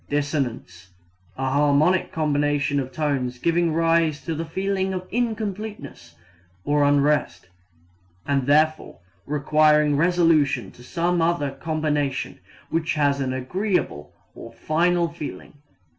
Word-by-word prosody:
Dissonance 135 - -3 0.5
a 135 0 -2
harmonic 145 +6 +2
combination 145 -2 0
of 130 -1 -4
tones 135 -5 -2
giving 170 +4 +1
rise 165 -1 +2
to 165 - -2
the 160 +1 -4
feeling 190 +2 -2
of 185 0 -6
incompleteness 210 - -4 0.5
or 145 0 +2
unrest, 145 -6 +1 0.8
and 140 -2 0
therefore 155 +2 +2 0.3
requiring 150 0 +3
resolution 155 -5 +2
to - - -17
some 170 +5 -1
other 165 -4 0
combination 150 -1 -2 0.3
which 165 +1 0
has 145 -2 +1
an 130 -1 -1
agreeable 130 - -2 0.2
or 115 - -11
final 170 +7 +1
feeling. 165 -3 -8
150 Hz, 115 wpm, -23 LUFS, 140-170 Hz, 0.8 s, requiring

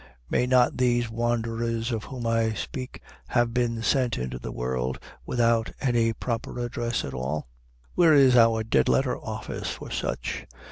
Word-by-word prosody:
May 125 - +2
not 125 -1 +4
these 120 -2 +2
wanderers 115 0 -1
of 110 -2 -3
whom 125 -3 -6
I 115 -1 +2
speak 130 +3 -6 0.2
have 120 -1 +1
been 115 -2 0
sent 125 -1 +2
into 65 0 -4
the - - -6
world 65 +1 -2 0.3
without 115 -2 +2
any 120 -4 +2
proper 115 +1 -4
address 120 -1 -2
at 65 - -6
all? 65 +3 -3 0.5
Where 165 -3 +5
is 135 -3 +6
our 115 -2 +5
Dead 110 - +2
Letter 130 -2 +2
Office 110 0 -5
for - - -7
such? - - -3
115 Hz, 155 wpm, -26 LUFS, 110-125 Hz, 0.5 s, is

